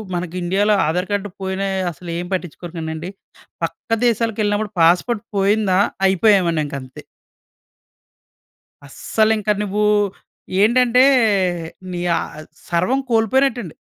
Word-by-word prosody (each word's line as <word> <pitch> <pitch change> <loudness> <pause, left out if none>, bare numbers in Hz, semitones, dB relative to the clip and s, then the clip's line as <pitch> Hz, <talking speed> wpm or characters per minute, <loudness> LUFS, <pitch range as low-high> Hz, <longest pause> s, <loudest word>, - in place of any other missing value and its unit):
మనకి 175 0 -4
ఇండియాలో 200 +4 +2
ఆధార్ 180 +4 -1
కార్డ్ 205 0 -1
పోయినా 190 +1 -2 0.2
అసలేం 170 +1 -6
పట్టించుకోరు 175 -1 -5
కానండి. 160 +1 -5 0.5
పక్క - - -5 0.2
దేశాలకెళ్ళినప్పుడు 215 -2 0
పాస్పోర్ట్ 180 +7 +3
పోయిందా, 195 -1 +2 0.3
అయిపోయామనింకంతే. 165 - +1 1.8
అస్సలింక 215 +8 0
నువ్వు 210 +1 -1 0.8
ఏంటంటే, 250 +3 +4 0.9
నీ 175 -1 -4
ఆహ్, - - -3
అద్ 155 - -12 0.2
సర్వం 180 +11 +1
కోల్పోయినట్టండి. 230 - +1
195 Hz, 90 wpm, -19 LUFS, 175-220 Hz, 1.8 s, ఏంటంటే